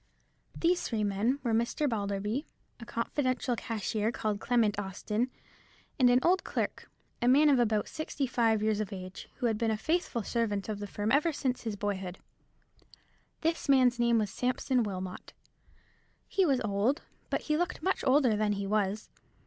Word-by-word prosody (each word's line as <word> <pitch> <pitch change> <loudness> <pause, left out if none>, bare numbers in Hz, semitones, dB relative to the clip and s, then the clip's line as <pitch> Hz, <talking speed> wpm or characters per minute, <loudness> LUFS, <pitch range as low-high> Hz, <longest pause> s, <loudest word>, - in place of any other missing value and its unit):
These 350 +1 +2
three 220 -3 -1
men 205 +6 +1
were 235 -3 0
Mr. 235 +6 +1
Balderby, 210 +3 -2 0.3
a 235 - -8
confidential 255 +1 -1
cashier 220 -1 -2
called 215 -3 -2
Clement 220 -4 +2
Austin, 210 +5 -2 0.7
and 250 -2 +6
an 245 +1 +5
old 370 +2 +3
clerk, - - -3 0.3
a 240 - +2
man 290 +4 +6
of 270 -3 +4
about 215 -3 +2
sixty 305 -2 -3
five 225 -4 +2
years 215 -1 +1
of 215 -3 -3
age, 185 -1 -8
who - - -3
had 220 -2 +1
been 230 -1 +1
a 220 - 0
faithful 315 - -1
servant 205 -3 -1
of 210 -1 -3
the 205 - -5
firm 205 +2 -2
ever 300 +4 +3
since 260 -4 -2
his 220 -3 -3
boyhood. 195 -3 -3 1.2
This 330 -2 -1
man's 255 -3 +5
name 235 -1 +4
was 210 -3 0
Sampson 250 0 0
Wilmot. 185 -4 -5 0.9
He 385 -3 +2
was 270 -3 +2
old, 215 +8 0 0.3
but - - 0
he 305 - 0
looked 350 +3 -2
much 380 - 0
older 260 -4 +4
than 210 0 +1
he 200 0 -3
was. 210 0 -1
230 Hz, 170 wpm, -30 LUFS, 205-260 Hz, 1.2 s, and